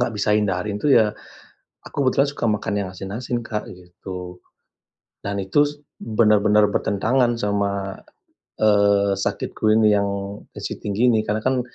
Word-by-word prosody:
gak 120 -2 0
bisa 105 +1 +1
hindarin 105 0 0
itu 150 - 0
ya 105 -2 +4 0.7
aku 140 - -4
kebetulan 135 +1 +3
suka 120 - -3
makan 105 0 -1
yang 95 - -4
asin-asin, 110 +6 -5
Kak, 105 -1 -4
gitu, 90 0 -9 0.8
dan 100 0 -4
itu 145 +10 +3 0.3
benar-benar 105 -2 +3
bertentangan 120 +5 +1
sama, 100 -2 -2 0.6
eee, 100 -1 +3
sakitku 110 - -2
ini 110 -1 +4
yang 100 -1 +2 0.5
tensi - - -6
tinggi 110 +4 +2
ini, 110 - +3
karena 110 +1 -1
kan 130 -1 +2
105 Hz, 140 wpm, -22 LUFS, 100-115 Hz, 0.8 s, ya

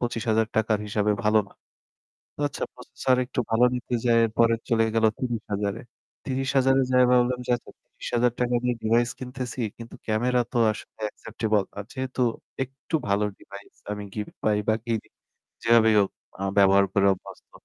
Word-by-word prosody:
৳২৫,০০০ 110 -2 0
র - - -8
হিসাবে 105 0 +1
ভালো 110 +1 +5
না। - - -19 0.8
তো - - -8
আচ্ছা - - -4
প্রসেসর 130 -1 -1
একটু 125 - -3
ভালো 115 +2 +4
নিতে 125 0 -3
যায়ে 115 -1 +4
এর - - -7
পরে 115 0 +5
চলে 115 -1 +3
গেল 115 - +2
৩০,০০০ 105 -5 -2
এ। - - -12 0.4
৩০,০০০ 135 0 +2
যায়ে 125 -1 +5
ভাবলাম 125 0 +3
যে, - - -2
"আচ্ছা, - - -15
৳৩০,০০০ 125 0 -1
দিয়ে 125 -1 +1
ডিভাইস 120 +2 +2
কিনতেছি, 125 -1 -5 0.2
কিন্তু 115 0 -10
ক্যামেরা 125 +3 +1
তো 120 - 0
আসলে 105 - -12
acceptable. 110 -3 -1
আর 100 - -5
যেহেতু 130 -1 -3 0.4
একটু 135 +5 -12
ভালো 100 +1 +2
ডিভাইস 100 0 -13 0.2
আমি 105 0 -5
গিফট 105 -1 -5
পাই 105 -1 +3
বা 110 - +5
কিনি, 115 -2 -2 0.6
যেভাবেই 115 -1 +5
হোক 100 - +2 0.3
আ - - -6 0.2
ব্যবহার 100 0 +6
করে 100 0 +4
অভ্যস্ত। 90 - -13
115 Hz, 165 wpm, -25 LUFS, 105-125 Hz, 0.8 s, ব্যবহার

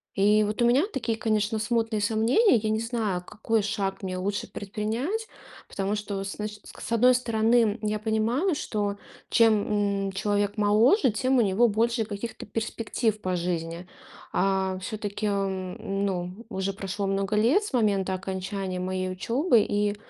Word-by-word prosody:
И 210 +2 +4
вот 210 +2 -2
у - - +5
меня 255 +5 +4
такие, 230 -3 -1
конечно, 215 0 0
смутные 225 0 0
сомнения. 230 - +3
Я 215 0 -1
не 220 +1 0
знаю, 225 -6 -2
какой 220 +2 -1
шаг 200 -2 -2
мне 185 -1 -3
лучше 200 +2 -2
предпринять. 225 - -3 0.4
Потому 195 +1 -2
что, 205 -2 -4
с 195 - -6
начи 210 0 -5
к - - -14
с - - -7
одной 250 +2 +5
стороны, 230 -2 +2
я 215 0 -1
понимаю, 225 - +1
что 205 -6 -2 0.3
чем, 205 -3 +2
м, 195 - -2
человек 205 0 0
моложе, 220 - +4
тем 255 +5 +1
у - - +6
него 215 +3 +3
больше 230 +2 +1
каких-то 210 +2 -6
перспектив 220 0 -2
по 185 -1 -1
жизни. 170 0 -3 0.5
А, 190 -1 +1
всё-таки, 205 +2 -4
м, 195 0 -2
ну, 185 +3 -4
уже 190 -2 -2
прошло 195 0 -4
много 195 +1 0
лет 240 - +3
с 410 - -6
момента 200 -5 +1
окончания 190 0 -4
моей 185 0 -2
учебы, 235 - +2
и 205 0 0
210 Hz, 160 wpm, -26 LUFS, 195-225 Hz, 0.5 s, у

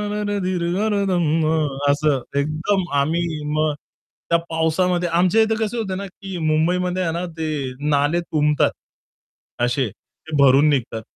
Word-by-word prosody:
न 210 - -2
अरे 205 0 -1
धीर 185 -2 -1 0.2
आ 210 -2 +1
धम्मा 160 -2 +2 0.4
असं 145 -1 +2 0.2
एकदम 155 +7 0 0.2
आम्ही 160 +2 -1
मग 155 0 +1 0.6
त्या 170 - +4
पावसामध्ये 175 +2 +1
आमच्या 180 +6 +3
इथे 220 0 +1
कसं 215 +3 -4
होत 195 -4 -2
ना, 200 - -5
की 195 -1 -8
मुंबईमध्ये 175 +4 +1
आहे 165 -2 -1
ना 170 +2 -3
ते 150 -5 -2 0.2
नाले 145 +3 +2
तुंबतात. 150 -3 +1 0.9
असे 125 0 0
ते 135 +9 -10
भरून 140 +1 +5
निघतात. 125 -6 -1
160 Hz, 145 wpm, -21 LUFS, 150-180 Hz, 0.9 s, भरून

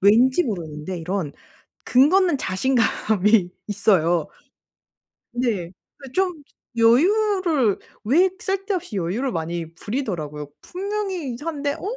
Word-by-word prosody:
왠지 245 - +5
모르는데 170 - -4
이런 170 -3 -3 0.5
근거 280 +9 +5
없는 335 -6 +1
자신감이 210 -3 +2 0.2
있어요. 180 -5 +2 1.1
네. 230 -8 -1 0.3
그 270 -2 -11
좀 360 -5 0 0.3
여유를 320 - +3 0.2
왜 330 - +4
쓸데없이 385 - -2
여유를 195 +9 -1
많이 165 0 -4
부리더라고요. 170 - -4
분명히 380 -6 -3
이상한데 290 +2 -3
어 - - -12
240 Hz, 245 characters per minute, -23 LUFS, -, 1.1 s, 왠지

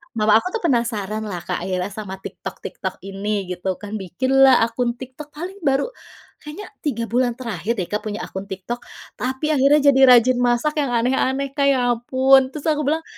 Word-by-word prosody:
mama 215 0 +4
aku - - -5
tuh 445 - -4
penasaran 220 - -1
lah 175 -4 -5
Kak - - -3
akhirnya 185 +1 -3
sama 200 -2 -6
TikTok - - -7
TikTok - - -5
ini 200 +1 -3
gitu 185 +1 -3
kan, 210 +2 -6
bikinlah 260 +7 +4
akun 235 +1 -1
TikTok 260 +4 -10
paling 370 +5 -7
baru 280 - 0 0.5
kayaknya 365 +9 -9
3 235 -6 -2
bulan 240 +1 0
terakhir 230 -4 -3
deh 190 - -2
Kak 210 - 0
punya 210 -1 -5
akun 190 +1 -7
TikTok, 195 +5 -5 0.4
tapi 265 +5 -1
akhirnya 285 +1 +4
jadi 265 - +2
rajin 250 0 +6
masak 245 +6 +1
yang 255 -4 0
aneh-aneh 265 +3 0
Kak 280 -1 +1
ya 250 -3 +3
ampun. 260 +3 +4
Terus 275 +2 -9
aku 300 -3 0
bilang, 320 +2 0
245 Hz, 180 wpm, -21 LUFS, 215-275 Hz, 0.5 s, rajin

